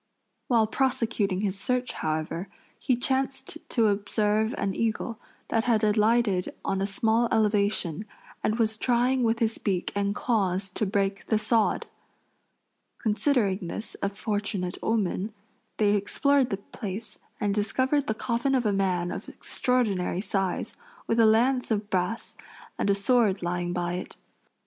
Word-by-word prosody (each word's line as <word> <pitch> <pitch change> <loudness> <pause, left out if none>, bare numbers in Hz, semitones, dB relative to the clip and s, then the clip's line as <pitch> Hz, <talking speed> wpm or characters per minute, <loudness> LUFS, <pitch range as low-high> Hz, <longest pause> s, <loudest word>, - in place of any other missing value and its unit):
While 230 -3 +4
prosecuting 220 -6 0
his 200 -2 -2
search, 250 0 -1
however, 155 +4 -3 0.3
he 255 - +2
chanced 270 +4 -1
to 230 -3 +2
observe 210 +2 +1
an 195 - -1
eagle 230 +1 -2 0.3
that 225 0 +1
had 230 -3 +2
alighted 210 -2 +2
on 195 0 0
a 195 - +1
small 225 +4 +2
elevation 205 -4 +1 0.4
and 215 - +1
was 220 -2 +1
trying 250 +2 +2
with 230 -1 +2
his 225 -1 0
beak 185 -4 -1
and 200 0 0
claws 195 -5 0
to 215 - -1
break 195 0 -1
the 220 - +3
sod. 220 0 +1 1.1
Considering 215 - +1
this 215 +6 -4
a 200 - +1
fortunate 200 -3 -3
omen, 210 -1 -1 0.4
they 205 -1 +3
explored 265 +6 +2
the 195 - -1
place 210 +1 -5 0.2
and 205 -1 +1
discovered 260 +7 +1
the 220 - 0
coffin 240 +4 0
of 250 -3 +1
a 210 - +2
man 185 -3 0
of - - -6
extraordinary 210 -9 0
size, 195 -2 -2 0.3
with 230 - +1
a 225 - +7
lance 250 +4 +3
of 210 -2 -1
brass 185 +5 -1 0.4
and - - +1
a 200 - +4
sword 205 -2 +2
lying 175 0 -1
by 175 0 -1
it. 180 - -6
215 Hz, 145 wpm, -27 LUFS, 195-235 Hz, 1.1 s, a